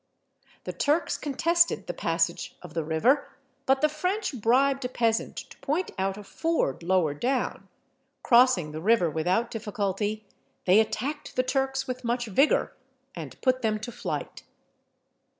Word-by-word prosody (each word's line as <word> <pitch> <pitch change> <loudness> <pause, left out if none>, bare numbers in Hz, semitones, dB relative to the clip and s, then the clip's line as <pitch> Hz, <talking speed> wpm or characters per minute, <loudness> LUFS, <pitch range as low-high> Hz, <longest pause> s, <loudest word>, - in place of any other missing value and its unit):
The - - -5
Turks 300 +3 +1
contested 335 +4 +1
the - - -4
passage - - -1
of 175 -3 -10
the 165 -1 -1
river, 195 - +2 0.4
but 270 0 +3
the 305 - +5
French 305 - -2
bribed 270 +4 +3
a 250 - -2
peasant 230 -3 0
to - - -9
point 320 +7 -1
out 195 +1 -1
a 210 - -8
ford 320 - -1
lower 170 -4 +2
down: 250 - -2 0.6
crossing 235 -10 +4
the 155 +1 -6
river 195 -4 +3
without 180 +10 0
difficulty, 210 -1 -2 0.4
they 190 +3 +6
attacked 265 +7 -2
the 255 - +2
Turks 270 +1 -1
with 255 0 -5
much 240 +1 -1
vigour, 250 +8 +2 0.4
and - - -8
put 255 -1 +2
them 215 -2 +1
to 220 +3 -7
flight. - - -5
240 Hz, 150 wpm, -27 LUFS, 195-270 Hz, 0.6 s, they